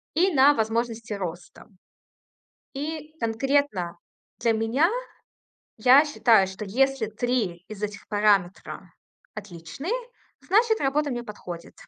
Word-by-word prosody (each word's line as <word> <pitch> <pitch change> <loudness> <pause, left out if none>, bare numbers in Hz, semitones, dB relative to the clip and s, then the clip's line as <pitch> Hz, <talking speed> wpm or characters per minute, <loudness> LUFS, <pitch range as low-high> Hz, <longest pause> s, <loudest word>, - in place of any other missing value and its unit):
и 365 +3 +3
на 280 +1 +6
возможности 225 -1 -2
роста. 180 -3 -7 1.1
И 305 +2 -5
конкретно 230 -6 0 0.4
для 230 - +2
меня, 225 +9 +2 0.9
я 255 +6 +7
считаю, 230 -9 +4
что 190 +3 -7
если 270 +2 +1
3 220 -6 -2
из 215 -1 -9
этих 205 -1 -5
параметра 205 -3 0 0.4
отличные, 205 - -6 0.5
значит, 440 +3 +3
работа 285 +1 +1
мне 240 -1 -3
подходит. 180 -5 -9
230 Hz, 105 wpm, -25 LUFS, 205-280 Hz, 1.1 s, я